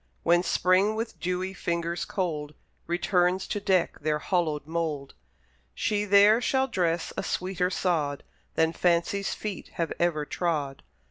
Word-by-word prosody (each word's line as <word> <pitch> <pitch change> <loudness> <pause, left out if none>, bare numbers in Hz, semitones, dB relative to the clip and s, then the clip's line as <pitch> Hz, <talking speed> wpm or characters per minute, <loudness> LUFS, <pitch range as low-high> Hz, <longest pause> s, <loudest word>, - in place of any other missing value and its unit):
When 175 +1 +4
Spring, 185 +4 +2
with 225 +1 -4
dewy 180 +1 -2
fingers 170 -1 -2
cold, 150 -6 -3 0.3
Returns 180 +1 +1
to 205 - -3
deck 190 -3 +1
their 155 -1 0
hallowed 155 -3 -1
mould, 155 -4 -3 0.6
She 210 -1 0
there 205 +3 +6
shall 265 +1 +1
dress 175 -7 -1
a - - -1
sweeter 180 -1 -1
sod 155 -7 -1 0.3
Than 160 0 +2
Fancy's 175 +4 +1
feet 210 -4 -5
have 165 -1 -2
ever 165 -4 +1
trod. 145 -4 -2
175 Hz, 135 wpm, -27 LUFS, 165-190 Hz, 0.6 s, there